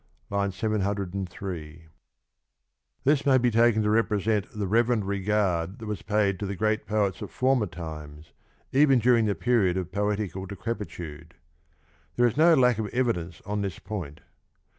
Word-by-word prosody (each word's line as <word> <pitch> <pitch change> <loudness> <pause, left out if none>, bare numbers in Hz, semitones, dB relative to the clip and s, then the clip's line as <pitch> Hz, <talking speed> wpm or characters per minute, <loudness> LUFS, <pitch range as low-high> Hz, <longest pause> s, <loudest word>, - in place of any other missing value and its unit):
(HI. 100 0 +1
703) 95 -5 -3
63 80 0 -18 1.1
This 140 0 +3
may 135 -2 +5
be 125 -1 +2
taken 115 -1 +4
to 105 - +1
represent 105 -2 +1
the 105 -1 -4
reverent 115 +1 +2
regard 100 -2 0
that 110 - -9
was 105 -4 -4
paid 100 -2 +1
to 100 - -3
the 100 - -3
great 110 +2 0
poets 105 -3 0
of - - -5
former 130 -4 +1
times 75 -3 -9 0.4
even 135 -1 +5
during 120 -1 +4
the 100 -2 0
period 105 -7 +2
of 90 -1 -4
poetical 100 -2 -2
decrepitude. 95 -6 -6 0.8
There 120 - +3
is 120 - +1
no 165 +3 +6
lack 125 -4 +3
of 110 - -1
evidence 100 -9 -2
on 105 0 -2
this 100 -5 -3
point. 95 -8 -6
105 Hz, 155 wpm, -26 LUFS, 95-115 Hz, 1.1 s, no